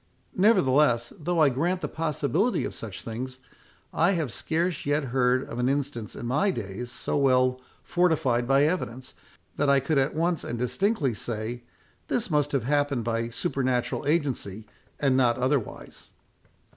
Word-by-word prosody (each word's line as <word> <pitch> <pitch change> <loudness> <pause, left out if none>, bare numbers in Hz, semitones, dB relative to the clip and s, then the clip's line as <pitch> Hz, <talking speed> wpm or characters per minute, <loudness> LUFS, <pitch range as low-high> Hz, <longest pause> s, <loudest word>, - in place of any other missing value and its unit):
Nevertheless, 140 - +3
though 175 +2 -2
I 150 -3 +6
grant 170 +8 -1
the - - -2
possibility 160 - 0
of - - -5
such 105 -4 -7
things, 130 +3 -5 0.6
I 175 +4 +3
have 160 - -1
scarce 165 +4 -1
yet 145 +1 +1
heard 130 0 +2
of 120 - -6
an 125 +1 +2
instance 135 -6 -3
in - - -6
my 145 +12 +2
days 115 - -4
so - - -3
well 130 -2 +3 0.2
fortified 155 -9 +1
by 135 +1 +4
evidence, 130 -6 -2 0.4
that 145 -1 +2
I 140 0 +5
could 140 +2 +1
at 135 +3 0
once 170 0 0
and 120 - -4
distinctly 140 - 0
say, 115 +2 -4 0.5
This 220 -7 -1
must 145 -1 +1
have 135 -5 0
happened 145 -2 +1
by 115 0 -1
supernatural 130 -1 -1
agency, 130 - -1 0.3
and 135 -3 +2
not 125 -3 +3
otherwise." 130 -2 -3
135 Hz, 155 wpm, -26 LUFS, 120-155 Hz, 0.6 s, I